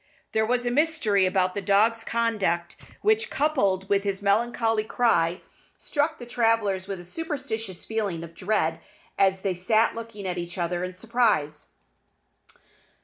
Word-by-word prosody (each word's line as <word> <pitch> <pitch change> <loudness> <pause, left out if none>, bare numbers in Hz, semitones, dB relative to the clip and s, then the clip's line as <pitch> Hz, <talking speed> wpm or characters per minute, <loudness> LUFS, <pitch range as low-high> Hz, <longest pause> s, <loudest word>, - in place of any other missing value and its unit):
There 220 0 +1
was 245 +1 +1
a 240 - +1
mystery 245 - +2
about 185 -1 +1
the 200 - -3
dog's 215 +4 +3
conduct 210 -8 0 0.3
which, 435 +2 +2
coupled 200 -11 +1
with 200 0 +2
his 200 -1 -1
melancholy 225 +2 +1
cry, 180 -7 +1 0.4
struck 310 +2 -1
the 240 - -9
travellers 225 -5 +1
with 195 -2 -4
a - - -9
superstitious 225 - -5
feeling 205 -7 -2
of 165 0 -10
dread, 165 -3 0 0.4
as 190 -1 +3
they 190 -1 0
sat 215 +6 +2
looking 230 -3 -8
at 180 -1 -2
each 175 +1 -6
other 175 0 -1
in 185 0 -5
surprise. 200 -9 0
205 Hz, 145 wpm, -26 LUFS, 185-230 Hz, 0.4 s, dog's